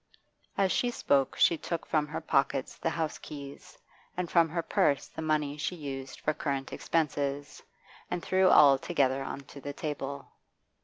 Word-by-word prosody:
As 195 -2 +3
she 245 - +1
spoke 140 - +1
she 170 - +4
took 170 -1 -4
from 150 -1 +1
her 160 +2 -5
pockets 135 -3 0
the - - -1
house 160 -2 -2
keys, 140 -2 -10 0.4
and 180 -2 -2
from 170 -2 +4
her 170 +1 -2
purse 140 -3 +1
the - - -8
money 150 -2 0
she 150 +4 -2
used 135 -4 -7
for 155 - +1
current 140 -3 -3
expenses, 145 -3 -1 0.5
and 175 - -3
threw 185 0 +3
all 140 -2 +7
together 135 -4 +1
on 135 +1 -5
to 140 +1 -12
the 145 +1 -5
table. 140 -2 -4
150 Hz, 165 wpm, -30 LUFS, 140-165 Hz, 0.5 s, all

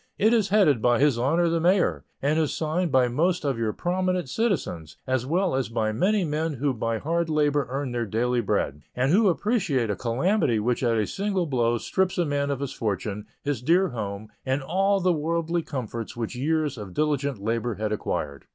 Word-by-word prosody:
It 220 +3 +4
is 220 -4 +2
headed 180 - +4
by 120 0 +3
His 140 -3 +3
Honor 165 +8 +2
the 165 0 +1
Mayor, 170 - +2 0.2
and 150 +3 +2
is 155 -3 0
signed 165 +2 -1
by 130 -1 +4
most 165 +7 0
of 135 -4 0
your 110 -2 0
prominent 180 0 -1
citizens, 140 - -2
as 130 -1 -1
well 180 +3 +1
as 130 -2 -1
by 110 -2 0
many 190 - +1
men 155 +1 -1
who 140 +1 0
by 115 -1 -2
hard 165 +6 -1
labor 145 -2 +1
earn 135 0 -3
their 120 -2 -2
daily 120 +4 0
bread, 75 -8 -1
and 130 +3 +1
who 205 +3 +5
appreciate 175 - 0
a - - -1
calamity 125 - +1
which 120 +3 0
at 120 -3 +2
a 105 - +1
single 195 - -1
blow 120 -5 +1
strips 190 - -1
a 175 - +2
man 145 -1 -1
of 140 -1 -2
his 140 - -3
fortune, 105 -1 -3 0.2
his 140 -5 -2
dear 175 +8 +3
home, 105 -3 -5
and 135 +1 -1
all 195 +6 +2
the 180 -1 +2
worldly 165 +2 -1
comforts 120 -5 -5
which 115 0 -3
years 150 0 0
of 95 -4 -8
diligent 140 -3 0
labor 115 +3 -2
had 110 +1 -2
acquired. 70 -8 -3
140 Hz, 200 wpm, -25 LUFS, 115-170 Hz, 0.2 s, who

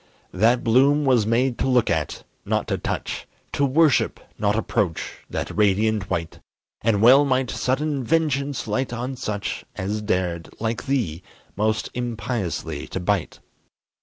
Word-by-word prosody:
That 115 +6 +3
bloom 140 +5 +4
was 120 -6 +3
made 120 +2 +1
to - - +1
look 125 -7 +3
at, 80 -2 -2 0.2
not - - -1
to - - -1
touch; - - -4 0.2
To 145 - 0
worship, 145 +2 +3 0.2
not 105 0 +2
approach, 100 -6 -1
that - - -4
radiant 105 0 +2
white; 85 -1 -3 0.4
And 110 -2 +2
well 130 +5 +8
might 130 -2 +1
sudden 140 +1 -1
vengeance 145 -1 0
light 130 -1 -1
on 125 +2 -4
such 105 -5 -4
As 105 +3 -2
dared, 90 -5 -1
like 115 +1 -2
thee, 110 - -1 0.3
most 110 +2 0
impiously 115 - -3
to - - -4
bite. 95 -1 -1
115 Hz, 140 wpm, -23 LUFS, 100-130 Hz, 0.4 s, well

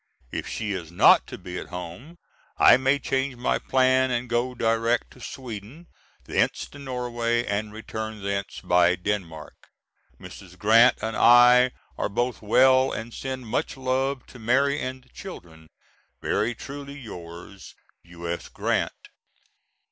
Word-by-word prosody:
If - - -4
she 105 -2 -3
is 85 -4 -6
not 85 - +5
to - - -8
be 90 0 -7
at - - -8
home 90 - -8 0.4
I - - +8
may 135 +2 +2
change 135 0 -2
my 120 +1 0
plan 130 0 +2
and 120 0 -1
go 120 +2 -1
direct 115 +1 0
to - - -16
Sweden, 125 - -9 0.3
thence - - 0
to 145 - -13
Norway, 120 -3 -2
and 105 +1 -2
return 110 -1 -6
thence 100 -1 -3
by 90 0 +4
Denmark. 90 -5 -4 0.7
Mrs. 90 0 -12
Grant 115 +4 +5
and 110 0 -2
I 125 +1 +7 0.3
are - - 0
both 120 +4 -2
well 130 +4 +4
and 115 +1 -6
send 130 -2 -5
much 110 - -2
love 130 +1 -1
to 125 - -14
Mary 135 +5 +2
and 130 0 -5
the 125 - -27
children. 80 - -11 0.5
Very 115 +2 -1
truly 140 +3 -8
yours, 90 -4 -10 0.3
U.S. 85 0 -6
GRANT. - - -2
120 Hz, 140 wpm, -25 LUFS, 100-130 Hz, 0.7 s, I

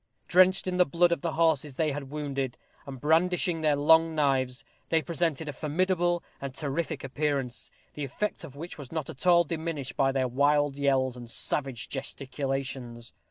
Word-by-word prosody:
Drenched 185 +1 +5
in 180 -1 -1
the 180 - +7
blood 170 +4 +3
of 170 - 0
the 170 -2 -2
horses 155 -4 +1
they 155 +1 +1
had 140 -1 -5
wounded, 140 -3 -3 0.3
and 135 -2 -7
brandishing 165 +3 +2
their 150 -2 +3
long 160 +3 +4
knives, 135 -3 0 0.2
they 165 - +3
presented 160 -2 -1
a 150 - -4
formidable 175 +4 0 0.2
and 135 -1 -5
terrific 150 +2 -3
appearance, 135 -3 -2 0.2
the 150 - -5
effect 140 +10 -3
of 140 - -10
which 165 +2 -8
was 140 -3 -9
not 160 -4 -3
at 135 +8 -6
all 175 -1 +7
diminished 160 -4 -4
by 135 -1 +3
their 135 -1 0
wild 145 +2 +2
yells 135 -3 +1
and 120 -1 -9
savage 135 0 -1
gesticulations. 135 -3 -5
145 Hz, 170 wpm, -28 LUFS, 135-165 Hz, 0.3 s, the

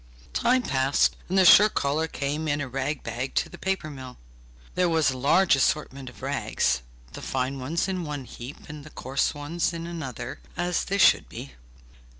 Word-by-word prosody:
Time 255 +1 +2
passed, 135 - +2
and 190 - 0
the 190 - +6
shirt 210 +4 +8
collar 150 +3 0
came 150 +1 -3
in 145 -1 0
a 145 - -3
rag 135 +3 -3
bag 120 +3 -4
to - - +1
the - - -11
paper 190 -4 -2
mill. 130 -4 -9 0.6
There 180 -1 +2
was 160 -4 +3
a 130 - -5
large 165 +6 +4
assortment 135 -1 -1
of 125 - -16
rags, 130 - 0 0.3
the - - -8
fine 130 +1 -2
ones 155 +8 -1
in 185 -2 -2
one 145 -4 -5
heap, 125 +4 -10
and 150 -1 -9
the 155 - -11
coarse 135 +2 -1
ones 155 +4 -2
in 165 0 -5
another, 160 - -6 0.2
as 175 0 0
they 200 - -1
should 200 - +5
be. 70 - -8
145 Hz, 185 wpm, -26 LUFS, 135-170 Hz, 0.6 s, shirt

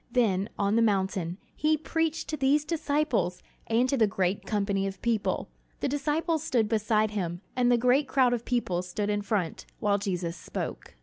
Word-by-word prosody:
Then, 210 -5 +2
on 200 +1 +1
the 230 - +4
mountain, 190 -5 0 0.2
he 310 0 +2
preached 325 +1 -1
to 310 - -1
these 285 +1 +2
disciples 300 - 0 0.2
and 235 +3 +3
to 275 - +1
the 220 -3 +4
great 190 -1 -1
company 200 -2 0
of 195 -1 -6
people. 230 -3 0 0.3
The - - 0
disciples 300 +3 0
stood 235 -8 +1
beside 215 0 +1
him, 175 -4 -3
and 245 -1 +3
the 240 - +5
great 250 +4 +3
crowd 260 -2 +3
of 240 -1 -2
people 235 -9 0
stood 205 +3 -2
in 205 0 0
front, 200 -5 -2
while 205 -1 +1
Jesus 180 -4 -2
spoke. - - -6
220 Hz, 180 wpm, -28 LUFS, 195-270 Hz, 0.3 s, the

